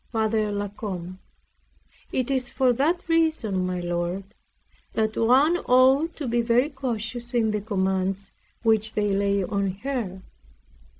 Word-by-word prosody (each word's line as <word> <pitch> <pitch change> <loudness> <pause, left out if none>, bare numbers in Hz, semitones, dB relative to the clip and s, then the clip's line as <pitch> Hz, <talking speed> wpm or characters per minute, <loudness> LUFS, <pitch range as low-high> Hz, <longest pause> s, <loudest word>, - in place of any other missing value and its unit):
F. 220 0 +1
LA 205 -2 0
COMBE 185 -3 -6 0.9
It 255 +1 -1
is 255 -2 0
for 255 -1 +2
that 325 +9 0
reason, 315 - +1
my 180 0 -2
lord, 175 +2 -2 0.7
that 220 0 0
one 270 +9 +4
ought 265 +4 +4
to 290 - -4
be 235 0 +1
very 240 +4 +2
cautious 240 -2 -4
in 220 -2 +2
the 210 -1 -1
commands 190 -1 -1 0.3
which 220 -1 +2
they 205 -1 +1
lay 200 0 +1
on 200 +1 -1
her. 225 -9 -3
220 Hz, 135 wpm, -25 LUFS, 195-255 Hz, 0.9 s, one